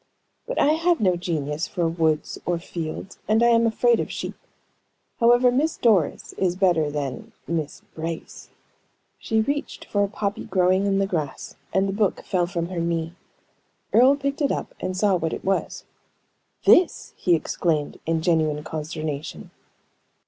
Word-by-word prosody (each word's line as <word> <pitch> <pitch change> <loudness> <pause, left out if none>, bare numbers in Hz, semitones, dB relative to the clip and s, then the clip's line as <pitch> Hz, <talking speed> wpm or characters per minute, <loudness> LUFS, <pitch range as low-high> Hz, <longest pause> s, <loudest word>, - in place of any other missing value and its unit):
"But - - -4
I 290 - +4
have 335 +2 +2
no 185 -4 +3
genius 160 -3 -2
for 175 -3 -1
woods 160 -2 0
or 175 -1 0
fields, 170 +2 -6
and 220 +2 +3
I 235 - +6
am 230 0 +4
afraid 235 +1 +3
of - - -3
sheep. - - -4 0.9
However, 240 +1 +5
Miss 295 +6 +1
Doris 205 -10 +2
is 180 -2 +1
better 175 -5 +2
than 145 -3 -5
Miss 160 -3 -3
Brace." 165 0 -6 0.7
She 220 0 +1
reached 285 +5 -3
for 205 -1 +1
a - - +1
poppy 200 0 -3
growing 185 +1 +2
in 195 -1 +2
the 195 - +2
grass, 160 -8 -4 0.2
and 190 +1 +2
the 195 - -2
book 205 -2 0
fell 180 -2 0
from 170 -2 -3
her 180 -2 -3
knee. 165 0 -1 0.8
Earle 255 +4 +6
picked 280 +2 -3
it 280 - +2
up, - - -3
and 185 0 -3
saw 200 0 +3
what 160 -1 -2
it - - -6
was. 195 0 -1 0.8
"This!" 360 - +4
he 175 -2 +2
exclaimed, 155 -2 -1
in 160 -1 0
genuine 155 -3 +1
consternation. 155 -1 -5
180 Hz, 160 wpm, -24 LUFS, 160-220 Hz, 0.9 s, I